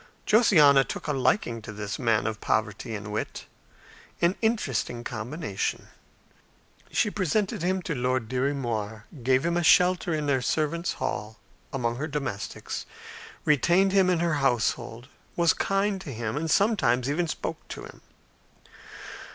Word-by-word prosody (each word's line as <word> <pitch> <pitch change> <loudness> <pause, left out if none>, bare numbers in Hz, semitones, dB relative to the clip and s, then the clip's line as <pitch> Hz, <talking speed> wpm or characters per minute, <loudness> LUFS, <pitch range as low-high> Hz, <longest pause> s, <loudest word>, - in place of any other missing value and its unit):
Josiana 155 - +6
took - - -6
a 150 - 0
liking 130 - +1
to 110 - -8
this 105 -1 -5
man 115 -4 +2
of 110 -2 -3
poverty 110 +1 -1
and 105 0 -6
wit, 105 - -4 0.7
an 175 +2 +2
interesting 135 - -1
combination. 120 - -4 1.0
She 210 - +1
presented 195 -1 0
him 185 +1 0
to 165 - -2
Lord 125 -2 -1
Dirry 130 +4 0
Moir, 110 -5 -3 0.2
gave 130 +4 +2
him 170 0 +1
a 175 - +2
shelter 180 +1 +4
in 155 -2 -1
the 135 -3 +1
servants' 160 +6 0
hall 110 +2 -4 0.3
among 120 -3 -1
her 150 +4 -3
domestics, 135 -9 -4 0.6
retained 175 +6 +4
him 190 -1 +4
in 175 -2 +2
her 170 -2 +1
household, 120 -1 0 0.3
was 170 -1 +4
kind 195 0 0
to 150 - -7
him, 115 -1 -3
and 160 +2 -2
sometimes 195 - +2
even 165 +5 0
spoke - - -4
to - - -7
him. - - -14
140 Hz, 145 wpm, -27 LUFS, 115-175 Hz, 1.0 s, Josiana